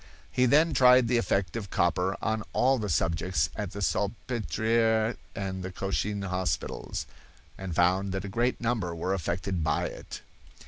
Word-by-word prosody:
He 125 0 +3
then 155 +5 +4
tried 125 -2 +6
the 120 0 +3
effect 95 -7 0
of 105 -4 -4
copper 90 +3 +1
on 110 0 0
all 130 0 +3
the 105 -2 -3
subjects 80 -1 0
at 105 -3 -3
the 100 +2 -5
Salpetriere 110 +2 0 0.2
and 95 -2 -4
the 90 0 -5
Cochin 100 +2 -2
hospitals, 90 -5 -2 0.5
and 95 -3 -6
found 95 +3 +2
that 95 +1 -3
a - - -4
great 120 +5 0
number 115 -8 -1
were 90 +3 -1
affected 90 0 -2
by 80 - +1
it." - - -7
100 Hz, 155 wpm, -28 LUFS, 90-115 Hz, 0.5 s, tried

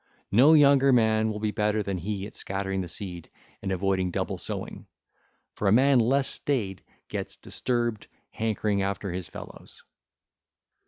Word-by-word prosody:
No 130 +10 +6
younger 140 -2 +6
man 110 -2 +3
will 105 - -3
be 105 0 -1
better 105 0 0
than 95 -2 -3
he 100 +2 -4
at 105 - -11
scattering 95 0 -3
the 90 - -5
seed 90 -4 -6 0.3
and 95 - -3
avoiding 95 0 0
double - - -3
sowing; - - -6 0.7
for 105 - -2
a - - +4
man 130 +3 +5
less 135 +4 +3
staid 105 -10 -1 0.2
gets - - -4
disturbed, 120 -3 -2 0.2
hankering 105 -2 -1
after 100 0 -2
his 90 -1 -5
fellows. - - -12
105 Hz, 150 wpm, -27 LUFS, 95-120 Hz, 0.7 s, No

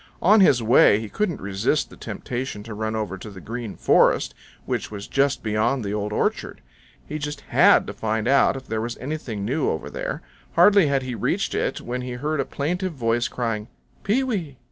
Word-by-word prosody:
On 210 +5 +6
his 130 -10 +5
way 110 -2 +6
he 110 -1 -6
couldn't 195 - -1
resist 95 0 0
the - - -11
temptation 120 -4 -5
to 110 0 -8
run 110 +1 -3
over 100 -4 -3
to 105 - -8
the 95 -2 -10
Green 115 +1 -6
Forest, - - +3 0.3
which - - -2
was 100 -1 -7
just 140 0 +1
beyond 110 +3 0
the 100 - -2
Old 105 0 -2
Orchard. - - -2 0.4
He 155 - -5
just 145 0 -5
HAD - - +5
to - - -6
find 110 0 -2
out 135 0 +4
if 130 - -9
there 110 -2 -2
was 115 +1 -4
anything 125 -7 -4
new 140 +8 0
over 80 - -4
there. - - -4 0.3
Hardly 195 0 +6
had 140 -2 +1
he 130 -1 -4
reached 115 - -1
it - - -1
when 125 +1 -4
he 125 0 -5
heard 150 +5 -2
a 135 - +1
plaintive 180 +5 -2
voice 120 -3 0
crying, 115 -3 -3 0.4
"Pee 230 +6 +2
wee! 180 - -3
120 Hz, 200 wpm, -23 LUFS, 110-145 Hz, 0.4 s, On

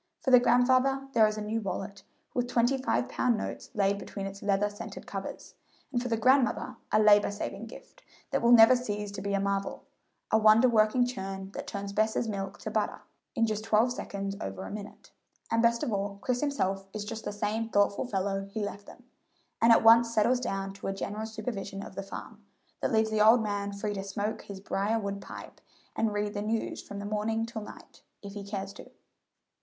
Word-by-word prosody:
For 265 - +1
the 250 - +9
grandfather 255 +3 +3
there 220 -2 +6
is 215 0 -3
a 215 - -3
new 220 +2 -2
wallet 195 0 -5 0.3
with 245 -1 0
twenty 240 +2 +2
five 260 -1 0
pound 245 -3 +1
notes - - -5
laid 200 -1 +2
between 200 -1 -6
its 195 0 -7
leather 200 0 +2
scented 205 0 -8
covers, - - -7 0.4
and 240 - +1
for 250 - -3
the 230 -2 0
grandmother 255 +1 +2
a 215 - +4
labor 210 -1 +6
saving 205 0 -5
gift - - -14 0.3
that - - +1
will 235 +1 +4
never 235 +1 +9
cease 210 -4 -3
to 200 -1 -6
be 200 0 -1
a - - +1
marvel 200 0 -2 0.5
a 220 - +5
wonder 215 +3 +6
working 230 +1 +4
churn 195 -5 -5
that - - -7
turns 200 -1 -5
Bess's 220 +2 +1
milk 195 -2 -4
to - - -5
butter - - -1 0.3
in 230 -3 +3
just 215 -1 -2
twelve 225 +3 +3
seconds 200 -4 -4
over 95 0 -5
a - - -7
minute. 205 0 -9 0.4
And 230 - +3
best 235 0 +3
of 225 - -1
all, 200 0 -2
Chris 250 -1 0
himself 195 -10 -1
is 210 -1 -4
just 220 +1 -6
the - - -2
same 210 +2 -2
thoughtful 205 +3 +2
fellow 195 -2 -1
he 210 +2 -4
left 205 0 -7
them, 250 - -14 0.6
and 230 - +6
at 225 - +6
once 230 +1 +7
settles 230 +3 +3
down 195 -5 -3
to 195 - -7
a 195 - -1
general 210 +3 -4
supervision 210 -3 -5
of - - -10
the 195 - -4
farm, 195 - -9 0.4
that - - -1
leaves 220 -1 +2
the 215 -1 +2
old 225 +2 +6
man 205 -1 -2
free 205 +1 -3
to 195 -1 -4
smoke 200 +2 -3
his 200 -1 -9
brier 200 +3 0
wood 200 -2 -3
pipe - - -10 0.3
and 225 -1 +1
read 205 0 -2
the 205 - -3
news 220 +2 -2
from 205 0 -7
morning 220 +2 -1
till 230 -1 -6
night, 210 - -12 0.2
if 200 0 -8
he 205 -1 -6
cares 195 -1 -5
to. - - -12
215 Hz, 210 wpm, -29 LUFS, 200-230 Hz, 0.6 s, the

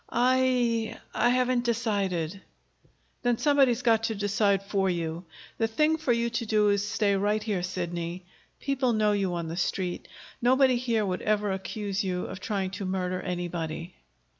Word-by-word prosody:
"I 245 -2 +2 0.2
I 240 - +3
haven't 250 0 +2
decided." 200 -7 -1 0.8
"Then 245 -1 +1
somebody's 270 -4 +3
got 225 -2 +4
to 225 - -1
decide 200 -1 +1
for 195 -1 0
you. 170 0 -3 0.3
The 225 - +2
thing 305 +8 +2
for 310 -5 0
you 235 0 +1
to 230 0 -2
do 210 -1 +3
is 200 -1 +2
to 205 - -3
stay 205 -2 +2
right 210 +2 +1
here, 205 -5 -1
Sidney. 175 -1 -4 0.3
People 265 -3 0
know 215 -1 +3
you 195 -3 0
on 170 -1 -3
the 165 +1 -5
Street. 180 -1 -2 0.3
Nobody 260 +1 +4
here 230 -3 0
would 185 -1 -2
ever 210 -1 +1
accuse 200 +1 -3
you 180 -1 -2
of 190 - -7
trying 190 -1 -2
to 195 0 -5
murder 185 -1 -2
anybody." 175 -2 -4
205 Hz, 165 wpm, -27 LUFS, 185-235 Hz, 0.8 s, got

